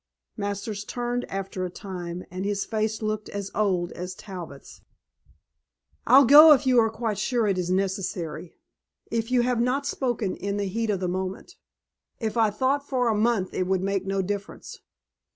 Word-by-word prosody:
Masters 205 0 -4
turned 245 +2 -3
after 195 -1 -4
a 180 - -2
time 180 -2 -7
and 185 +1 -4
his 200 0 -1
face 220 0 -2
looked 215 0 -2
as 200 -1 -5
old 185 -5 0
as 180 +1 -6
Talbot's. 175 -9 -10 1.3
"I'll 275 +1 +8
go 300 +5 +10
if 270 - +1
you 255 -2 +5
are 225 -1 +3
quite 220 -2 -3
sure 235 +1 +1
it 195 -3 +1
is 180 -1 -2
necessary. 185 -3 -2 0.6
If 230 0 -1
you 250 -1 +3
have 245 -1 +1
not 260 +4 0
spoken 240 -9 -1
in 200 +1 -3
the 205 - -1
heat 225 +4 -2
of 195 -3 0
the 180 - 0
moment." 185 - -4 0.7
"If 220 -2 -3
I 225 -2 +4
thought 265 +7 -1
for 250 -3 +1
a 220 - +1
month 215 -3 +1
it 185 - -1
would 190 -1 0
make 195 -1 -1
no 195 0 0
difference. 200 +1 -6
205 Hz, 175 wpm, -25 LUFS, 190-235 Hz, 1.3 s, go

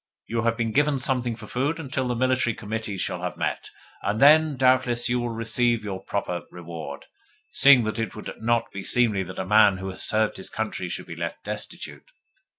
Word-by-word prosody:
You 115 0 -2
have 115 0 +1
been 115 -2 -1
given 145 +2 +2
something 125 -2 -1
for 110 -1 -10
food 140 +9 -1
until 130 -4 -2
the 125 - -1
Military 130 -1 +1
Committee 110 -1 -4
shall - - -2
have - - -4
met, - - -3 0.3
and 105 +2 -1
then, 150 0 +6
doubtless, 130 -2 +3
you 125 0 +1
will 120 0 -2
receive 115 0 +1
your 95 -3 -5
proper 90 -3 -3
reward, 80 -5 -8 0.5
seeing 135 -3 +6
that 110 +1 -3
it 115 -5 -3
would 105 - -7
not 115 0 +1
be 100 - -6
seemly 115 -5 +2
that 95 0 -7
a - - -2
man 105 -1 +5
who 95 +1 -5
has 95 - -4
served 110 0 +1
his 95 - -7
country 110 -5 -3
should - - -4
be - - -8
left - - -5
destitute. - - -7
115 Hz, 200 wpm, -25 LUFS, 105-125 Hz, 0.5 s, then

